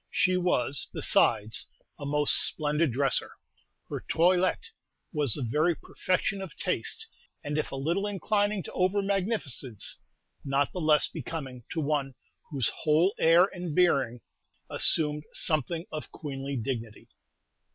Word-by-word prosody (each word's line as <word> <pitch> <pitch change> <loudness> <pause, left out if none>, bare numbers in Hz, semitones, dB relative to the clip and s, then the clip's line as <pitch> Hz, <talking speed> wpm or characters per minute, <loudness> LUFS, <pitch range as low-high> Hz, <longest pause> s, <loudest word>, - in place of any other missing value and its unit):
She 225 -7 +2
was, 145 -7 +1
besides, 105 +1 +2 0.3
a 140 - -5
most 150 0 +3
splendid 150 -1 +3
dresser. 135 0 0 0.5
Her - - -5
toilet 185 - +2 0.4
was 145 -8 +1
the 140 - -3
very 155 +8 +1
perfection 190 +4 -2
of 190 -3 -8
taste, 450 - -2 0.4
and 145 0 -3
if 155 - -2
a - - -4
little 170 +9 -1
inclining 205 0 0
to - - -9
over 190 +2 +1
magnificence, 190 - -3 0.4
not 140 0 0
the 180 - -4
less 155 -1 +4
becoming 135 -5 -7
to 165 - -2
one 140 -3 -1 0.3
whose 135 -7 0
whole 160 +5 +2
air 165 +3 +6
and 175 -4 -5
bearing 135 -10 +2 0.5
assumed 150 -1 +3
something 160 +2 +1
of 155 -1 -6
queenly 140 -2 -5
dignity. 115 -2 -5
155 Hz, 130 wpm, -28 LUFS, 135-180 Hz, 0.5 s, air